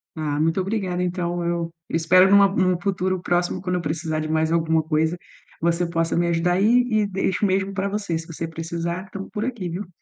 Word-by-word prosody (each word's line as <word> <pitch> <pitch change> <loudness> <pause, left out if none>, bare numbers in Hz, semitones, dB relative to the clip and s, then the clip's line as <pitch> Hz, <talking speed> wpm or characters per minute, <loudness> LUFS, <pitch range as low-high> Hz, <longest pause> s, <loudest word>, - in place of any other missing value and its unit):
Ah, 150 -2 -2
muito 165 +4 +1
obrigada. 185 -3 -2
Então 175 -1 -2
eu 170 -1 -1 0.2
espero 180 +3 +5
em 200 - +4
uma 200 0 +8
em 185 -1 +2
um 175 - -3
futuro 185 -1 -1
próximo 175 0 0
quando 180 -1 -2
eu 180 - -1
precisar 160 0 -2
de 155 - -3
mais 160 0 +1
alguma 160 -1 +2
coisa, 160 +2 0 0.4
você 170 +1 +1
possa 165 -1 0
me 170 0 +2
ajudar 170 +1 +1
aí 190 +3 +2 0.2
e 215 -2 +1
e - - -1
deixo 195 +1 0
mesmo 195 +1 0
para 195 +1 -1
você, 200 -5 -2
você 165 0 -5
precisar 170 +2 -4
estamos 195 0 -8
por 215 +2 -3
aqui, 230 -9 -4
viu. 180 +3 -5
175 Hz, 215 wpm, -23 LUFS, 165-190 Hz, 0.4 s, uma